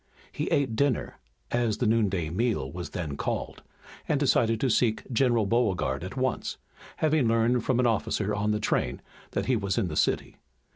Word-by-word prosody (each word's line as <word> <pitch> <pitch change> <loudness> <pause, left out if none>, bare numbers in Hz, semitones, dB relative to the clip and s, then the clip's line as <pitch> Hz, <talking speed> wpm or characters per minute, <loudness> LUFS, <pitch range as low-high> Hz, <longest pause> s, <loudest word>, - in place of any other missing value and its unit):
He - - -3
ate 130 -5 +1
dinner, 140 -1 0 0.3
as 120 -3 +1
the 125 - 0
noonday 100 -8 +1
meal 100 - 0
was 90 +2 -6
then 80 -6 -4
called, - - -3 0.5
and 150 -3 +1
decided 115 -5 +2
to 135 - +2
seek 110 -1 +2
General 120 -2 +3
Beauregard 100 - 0
at 95 +8 -7
once, 130 -2 -1 0.4
having 155 -5 +2
learned 115 +1 +2
from 130 -2 +1
an 125 - +3
officer 105 -2 0
on 105 +1 0
the 105 0 +1
train 60 -11 -1 0.3
that - - -1
he 130 - +2
was 100 -2 -1
in 100 -7 +1
the 75 - -5
city. - - 0
115 Hz, 180 wpm, -27 LUFS, 100-125 Hz, 0.5 s, General